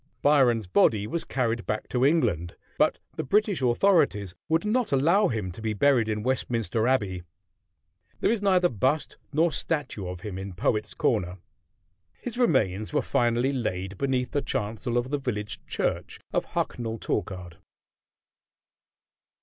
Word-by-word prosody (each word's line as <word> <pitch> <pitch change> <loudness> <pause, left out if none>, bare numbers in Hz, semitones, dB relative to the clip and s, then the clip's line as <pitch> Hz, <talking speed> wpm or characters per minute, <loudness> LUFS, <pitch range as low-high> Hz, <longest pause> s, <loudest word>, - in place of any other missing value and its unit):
Byron's 130 -7 +4
body 100 +3 +3
was 165 +10 -3
carried 115 -3 -1
back 105 - -2
to 125 0 0
England; 90 - +2 0.2
but - - +3 0.2
the - - -1
British 205 - +1
authorities 120 - +2 0.2
would 165 +4 +2
not 230 +1 +1
allow 170 +10 +4
him 105 -6 -2
to 95 - -10
be 110 -1 -1
buried 120 -1 +3
in 105 -1 -2
Westminster 115 -3 0
Abbey. 100 -9 +1 1.0
There - - +2
is 230 -3 0
neither 185 -3 +4
bust 130 - -1
nor 160 +3 +2
statue 145 - -3
of 90 -1 -6
him 95 -2 -5
in 95 0 -6
Poets' 105 +4 -1
Corner. 90 -5 0 0.8
His 245 - -6
remains 110 - +2
were 150 - +1
finally 120 0 +1
laid 95 -6 -3
beneath 130 -2 0
the 145 - 0
chancel 115 +3 -2
of 125 +2 -1
the 145 - 0
village 105 -6 -4
church - - -2
of - - +1
Hucknall 115 -1 -3
Torkard. 90 -6 -4
120 Hz, 145 wpm, -26 LUFS, 105-145 Hz, 1.0 s, Byron's